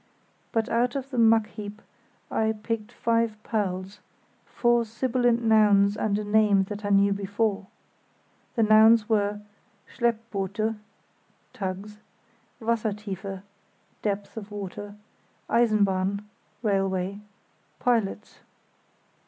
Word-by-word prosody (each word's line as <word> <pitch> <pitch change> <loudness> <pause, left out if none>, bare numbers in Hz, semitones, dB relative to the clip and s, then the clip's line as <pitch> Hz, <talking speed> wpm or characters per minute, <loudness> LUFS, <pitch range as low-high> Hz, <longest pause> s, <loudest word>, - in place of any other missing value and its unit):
But 225 -1 0
out 240 +2 +1
of 270 0 -4
the 250 - -1
muck 225 -1 +5
heap 210 -1 -8 0.5
I 220 0 +1
picked 225 -1 -3
five 230 -2 0
pearls—four 205 +4 -2
sibilant 240 +1 +1
nouns 210 -2 +4
and 210 -1 0
a 210 - -2
name 205 -2 +3
that 210 0 -6
I 205 - -2
knew 200 0 +4
before. 200 0 -1 0.9
The 230 - +3
nouns 220 0 +6
were 205 -1 0 0.4
"Schleppboote" 220 -3 -1 0.8
(tugs); 200 +2 -5 0.6
"Wassertiefe" 210 -4 -3 0.6
(depth 205 +1 -3
of 210 -2 -7
water); 205 0 -7 0.5
"Eisenbahn" 200 -4 +2 0.4
(railway); 195 -3 +1
"Lotsen" - - -17 0.6
(pilots). 225 -4 -1
210 Hz, 100 wpm, -26 LUFS, 200-225 Hz, 0.9 s, nouns